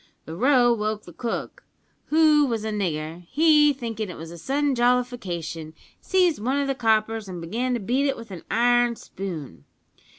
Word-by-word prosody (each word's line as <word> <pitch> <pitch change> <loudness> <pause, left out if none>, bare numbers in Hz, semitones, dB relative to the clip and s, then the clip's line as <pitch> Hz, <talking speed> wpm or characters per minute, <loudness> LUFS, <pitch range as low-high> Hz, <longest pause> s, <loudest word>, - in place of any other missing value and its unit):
The 160 - -7
row 245 +2 +4
woke 215 -1 -2
the 175 - -13
cook, 245 - -5 0.4
who 305 -2 +4
was 225 -3 -2
a 220 - -2
nigger; 170 -4 -3
he, 300 -1 +5
thinkin' 225 -6 -4
it 180 - -8
was 165 +1 -9
a 170 - -9
sudden 280 - 0
jollification, 210 -11 -1 0.3
seized 360 - +2
one 260 +4 +1
o' 285 - +1
the 275 - 0
coppers 220 -3 0
an' 180 -2 -6
began 235 +9 -2
to - - -2
beat 255 +7 0
it 275 - -1
with 230 -3 -10
an 180 -4 -7
iron 240 0 +3
spoon. 160 - -7
230 Hz, 175 wpm, -24 LUFS, 185-265 Hz, 0.4 s, he